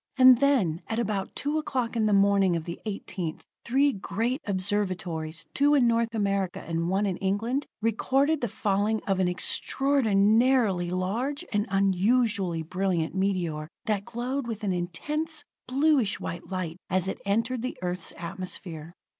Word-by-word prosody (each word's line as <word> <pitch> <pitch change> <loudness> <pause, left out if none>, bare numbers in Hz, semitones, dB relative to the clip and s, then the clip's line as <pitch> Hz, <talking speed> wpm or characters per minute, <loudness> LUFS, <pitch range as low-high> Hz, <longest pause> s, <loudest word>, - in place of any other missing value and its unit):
And 255 -2 +8
then, 225 - +2
at 225 - -2
about 210 -4 -2
two 295 +2 -1
o'clock 250 -6 -2
in 220 -2 +2
the - - +2
morning 200 -2 +4
of 165 - -2
the 170 +1 -6
18th, 185 -5 -4 0.2
three 275 +3 +3
great 225 +7 -2
observatories, 185 -5 -2
two 290 +1 +4
in 265 -4 +4
North 230 0 +1
America 195 -3 0
and 165 +1 -2
one 195 +3 +1
in 190 -3 -1
England, 225 +8 -1 0.2
recorded 270 +7 +2
the 240 - 0
falling 205 +2 0
of 195 -1 0
an 185 - +3
extraordinarily 220 -2 +2
large 220 +11 -2
and 210 +1 +1
unusually 195 -2 +2
brilliant 180 -1 -1
meteor 180 -6 -1 0.2
that 210 -4 0
glowed 245 +2 -3
with 225 -2 -5
an 195 -3 +1
intense, 300 - -3 0.2
bluish 270 -4 +2
white 170 +2 -6
light 180 -3 -3
as 185 0 +1
it 195 - -4
entered 230 +5 0
the 255 - -4
Earth's 180 0 -2
atmosphere. 170 -2 -6
200 Hz, 150 wpm, -27 LUFS, 185-240 Hz, 0.2 s, And